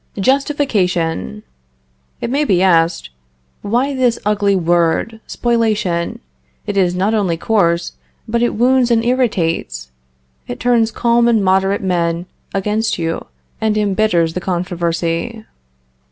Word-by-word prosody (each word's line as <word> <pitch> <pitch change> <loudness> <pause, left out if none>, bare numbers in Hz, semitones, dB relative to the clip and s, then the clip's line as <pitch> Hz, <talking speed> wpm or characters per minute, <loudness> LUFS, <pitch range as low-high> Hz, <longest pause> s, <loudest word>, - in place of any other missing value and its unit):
JUSTIFICATION. 190 - 0 0.8
It 235 - -3
may 285 +3 +1
be 190 -9 +2
asked, 165 - +2 0.5
"Why 245 +7 0
this 250 -3 +1
ugly 205 -1 +2
word 175 +5 +1
spoliation? 215 -8 -1 0.4
It 205 - -3
is 180 -2 +2
not 195 +4 +1
only 190 -6 0
coarse, 170 -4 +1 0.4
but 235 +1 0
it 240 - +1
wounds 250 +2 +3
and 230 -1 +2
irritates; 165 - -1 0.6
it 120 - -6
turns 235 -2 +2
calm 235 +1 +2
and 225 -4 +2
moderate 190 +1 +2
men 170 -2 -1 0.3
against 210 +3 -1
you, 165 -1 -3 0.3
and 215 -1 +1
embitters 200 -5 +1
the 180 - -4
controversy." 175 +3 -2
200 Hz, 120 wpm, -17 LUFS, 170-230 Hz, 0.8 s, wounds